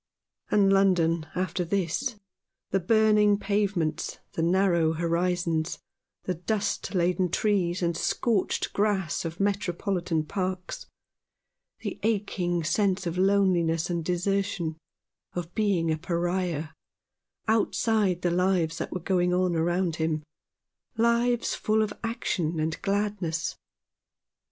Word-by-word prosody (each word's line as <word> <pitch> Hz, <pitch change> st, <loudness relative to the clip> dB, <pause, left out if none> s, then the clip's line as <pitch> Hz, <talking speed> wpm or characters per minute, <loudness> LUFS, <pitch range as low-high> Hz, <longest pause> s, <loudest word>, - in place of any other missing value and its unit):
And 195 Hz, -1 st, +4 dB
London 170 Hz, -4 st, +3 dB
after 185 Hz, 0 st, -1 dB
this: 200 Hz, +8 st, -1 dB, 0.6 s
the 195 Hz, -, +2 dB
burning 210 Hz, +1 st, +4 dB
pavements, 200 Hz, -6 st, -1 dB
the -, -, -3 dB
narrow 170 Hz, -2 st, +3 dB
horizons, 170 Hz, 0 st, 0 dB, 0.5 s
the 185 Hz, -, -1 dB
dust 200 Hz, +3 st, -2 dB
laden 180 Hz, +1 st, +2 dB
trees 185 Hz, -2 st, +1 dB
and 170 Hz, -1 st, +1 dB
scorched 225 Hz, -6 st, 0 dB
grass 195 Hz, -7 st, 0 dB
of 165 Hz, +1 st, -5 dB
Metropolitan 185 Hz, -4 st, 0 dB
parks; 185 Hz, +1 st, -4 dB, 0.9 s
the -, -, -5 dB
aching 190 Hz, -5 st, 0 dB
sense 190 Hz, +2 st, +1 dB
of 170 Hz, +1 st, -2 dB
loneliness 185 Hz, -4 st, +2 dB
and 170 Hz, -1 st, -1 dB
desertion, 180 Hz, -1 st, -1 dB, 0.6 s
of 175 Hz, -1 st, -5 dB
being 190 Hz, -7 st, +1 dB
a 155 Hz, -, -1 dB
Pariah, 175 Hz, -2 st, -1 dB, 0.8 s
outside 215 Hz, -4 st, +1 dB
the 175 Hz, -, +2 dB
lives 175 Hz, -2 st, +1 dB
that -, -, -4 dB
were 185 Hz, -, -3 dB
going 180 Hz, 0 st, +1 dB
on 180 Hz, -1 st, +1 dB
around 175 Hz, +1 st, 0 dB
him 160 Hz, -1 st, -1 dB, 0.4 s
— -, -, -55 dB
lives 235 Hz, +1 st, +2 dB
full 215 Hz, 0 st, +1 dB
of 210 Hz, -1 st, -3 dB
action 175 Hz, -8 st, -1 dB
and 155 Hz, +1 st, -2 dB
gladness. 195 Hz, -5 st, -1 dB
180 Hz, 115 wpm, -27 LUFS, 170-200 Hz, 0.9 s, And